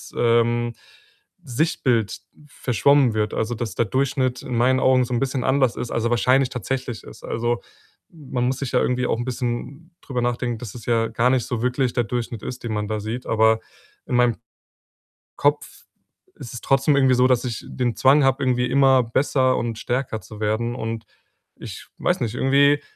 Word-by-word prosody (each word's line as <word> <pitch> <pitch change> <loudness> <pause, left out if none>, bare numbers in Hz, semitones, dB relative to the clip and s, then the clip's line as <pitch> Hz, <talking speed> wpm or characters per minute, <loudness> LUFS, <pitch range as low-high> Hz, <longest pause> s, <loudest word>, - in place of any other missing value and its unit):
ähm, 120 0 +2 0.7
Sichtbild 125 -5 0 0.3
verschwommen 135 0 +2
wird. 105 0 -1
Also, 110 +2 -1
dass 115 0 -4
der 115 - +1
Durchschnitt 130 +2 0
in 125 - -4
meinen 130 +2 +3
Augen 130 -1 +4
so 125 - -5
'n 120 - +1
bisschen 135 0 -1
anders 130 -2 +2
ist 120 - -5
als 115 - -1
er - - +2
wahrscheinlich 125 +2 +3
tatsächlich 125 -3 -4
ist. - - -13
Also, 120 +1 -1 0.5
man 135 -6 -4
muss 130 +1 0
sich 135 -3 -4
ja - - +3
irgendwie 125 0 0
auch - - 0
'n 120 - -3
bisschen 130 +7 -4
drüber 125 -3 -3
nachdenken, 120 -1 -1
dass 115 -6 -8
es 115 -4 -10
ja 115 -1 +2
gar 125 +2 +2
nicht 130 -3 +1
so 120 -2 -3
wirklich 125 0 0
der 120 -2 0
Durchschnitt 120 -1 -4
ist, 125 0 -6
den 115 -2 -3
man 105 -1 -2
da 110 -1 -2
sieht. 115 +4 -5
Aber 110 0 +3 0.5
in 125 - -1
meinem 120 -2 +3 1.0
Kopf 145 +1 -1 0.5
ist 120 - -9
es 125 - -6
trotzdem 135 +1 +3
irgendwie 130 -2 +4
so, 125 +1 +4
dass 125 -1 +2
ich 115 - -5
den 120 -2 -2
Zwang 140 +3 +5
habe, 135 +1 +2
irgendwie 125 -1 +1
immer 135 -1 +4
besser 130 +2 +1
und 115 -2 -3
stärker 120 -3 -2
zu 105 - -11
werden 110 +3 -1
und 115 -2 -5 0.5
ich - - -9
weiß - - 0
nicht, 115 -1 -2
irgendwie 140 +2 +3
125 Hz, 190 wpm, -22 LUFS, 115-130 Hz, 1.0 s, Zwang